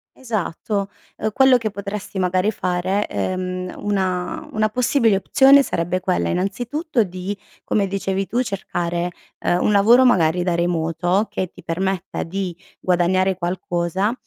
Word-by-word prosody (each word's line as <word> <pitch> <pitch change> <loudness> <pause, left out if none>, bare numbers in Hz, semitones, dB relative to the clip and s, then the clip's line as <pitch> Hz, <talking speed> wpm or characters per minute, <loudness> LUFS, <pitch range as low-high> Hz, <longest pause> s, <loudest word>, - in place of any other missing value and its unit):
Esatto, 205 -4 -3 0.3
uhm, 215 - -2
quello 265 +3 +5
che 225 -3 -3
potresti 200 0 -5
magari 185 +3 +1
fare, 185 +1 -1
ehm, 185 0 -3
una 190 - -2
una 215 -4 +1
possibile 235 -1 +2
opzione, 275 +7 +5
sarebbe 175 -4 -1
quella 185 0 0
innanzitutto 240 - -1
di, 185 +2 -5 0.3
come 200 -2 +1
dicevi 195 0 -2
tu, 245 - 0
cercare, 175 -5 -3 0.3
ehm, 175 +1 +1
un - - +3
lavoro 220 +5 +6
magari 180 -7 +3
da 175 -1 0
remoto, 175 +3 0
che 185 - -2
ti - - -15
permetta 185 +2 -2
di 185 +1 -3 0.3
guadagnare 185 +1 +2
qualcosa 180 +2 -1
190 Hz, 135 wpm, -21 LUFS, 180-215 Hz, 0.3 s, lavoro